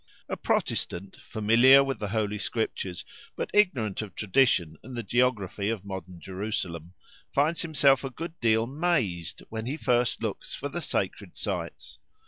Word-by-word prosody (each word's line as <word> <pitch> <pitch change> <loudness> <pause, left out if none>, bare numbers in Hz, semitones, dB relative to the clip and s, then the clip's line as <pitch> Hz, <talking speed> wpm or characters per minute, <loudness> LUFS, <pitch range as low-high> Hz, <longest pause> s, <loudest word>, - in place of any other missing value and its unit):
A - - -2
Protestant, 95 +2 -1
familiar 120 +5 +5
with 135 -5 -3
the 105 - -2
Holy 105 0 -1
Scriptures, 95 -5 -2 0.3
but - - -3
ignorant 130 - +2
of 105 -3 -8
tradition 95 - +2
and 125 0 -8
the 120 - -2
geography 105 -3 +1
of 110 -4 -3
modern 95 -2 -7
Jerusalem, 90 -3 -4 0.4
finds 155 +4 +2
himself 140 -5 +4
a 135 - -2
good 165 +6 -6
deal 110 -1 +3
"mazed" 125 - -1
when 110 +1 -4
he 140 +4 -2
first 120 -5 +1
looks 110 -3 -3
for 145 - -4
the 175 +4 -4
sacred - - -3
sites. - - -4
110 Hz, 150 wpm, -28 LUFS, 100-135 Hz, 0.4 s, familiar